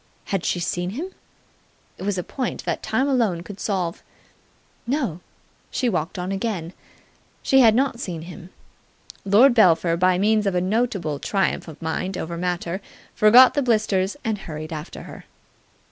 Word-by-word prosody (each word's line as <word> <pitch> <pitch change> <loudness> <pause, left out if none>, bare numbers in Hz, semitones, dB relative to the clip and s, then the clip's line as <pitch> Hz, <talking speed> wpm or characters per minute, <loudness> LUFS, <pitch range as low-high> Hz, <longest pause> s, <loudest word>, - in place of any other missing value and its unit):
Had 195 -3 -2
she 175 - 0
seen 175 +1 -2
him? 315 - -5 0.9
It - - -10
was 195 0 -1
a 180 - -2
point 255 +5 -4
that - - -2
time 220 +6 0
alone 225 -11 +1
could 200 +1 -10
solve. 180 -5 -2 0.9
No! 245 - -1 0.5
She 250 - 0
walked 175 -2 -2
on 180 +1 -3
again. 195 -4 -3 0.7
She 270 - +4
had 225 -4 +6
not 260 -2 +1
seen 170 -9 -5
him. 175 +1 -10 0.8
Lord 225 +7 +6
Belpher, 175 -6 +4
by 180 +1 +3
means 210 +2 +2
of 195 - 0
a - - +3
notable 185 - -1
triumph 195 +1 -1
of 160 -1 -10
mind 180 +4 -2
over 170 +1 -4
matter, 175 +1 -3 0.3
forgot 245 +4 +7
the 285 - +1
blisters 215 -3 +1
and 220 -2 -1
hurried 155 -3 -7
after 155 +2 -7
her. - - -11
195 Hz, 160 wpm, -23 LUFS, 175-225 Hz, 0.9 s, forgot